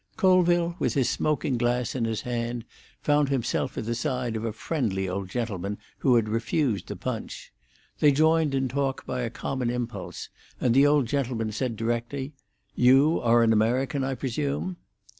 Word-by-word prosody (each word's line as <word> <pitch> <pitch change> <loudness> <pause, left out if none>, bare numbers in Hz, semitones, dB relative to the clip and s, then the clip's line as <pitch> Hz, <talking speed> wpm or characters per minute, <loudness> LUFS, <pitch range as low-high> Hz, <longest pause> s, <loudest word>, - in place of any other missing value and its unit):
Colville, 175 -4 +3
with 125 - 0
his 135 -4 +2
smoking 145 -4 0
glass 120 0 0
in 125 -3 -1
his 110 -1 -2
hand, 120 -1 -3 0.4
found 145 -1 +3
himself 135 -4 -1
at - - -3
the 115 - -1
side 120 0 -2
of 110 - -3
a 115 - -1
friendly 105 -7 -2
old 95 +1 -4
gentleman 105 -3 -3 0.2
who 130 -3 +4
had 115 -2 +3
refused 115 - 0
the - - -5
punch. - - -6 0.5
They 150 - +6
joined 155 0 +3
in 135 -1 +1
talk 135 +1 -2
by 125 - -3
a 120 - -2
common 125 +1 -3
impulse, 120 -1 -5 0.3
and 125 - +2
the 135 +3 +6
old 145 -2 +3
gentleman 120 -4 -1
said, 115 +2 -2
directly, 120 +5 -3 0.4
"You 135 +6 +4
are 120 0 +4
an 115 -1 +4
American, 125 +5 +1
I 135 0 -1
presume?" 140 +7 -2
125 Hz, 170 wpm, -26 LUFS, 115-140 Hz, 0.5 s, They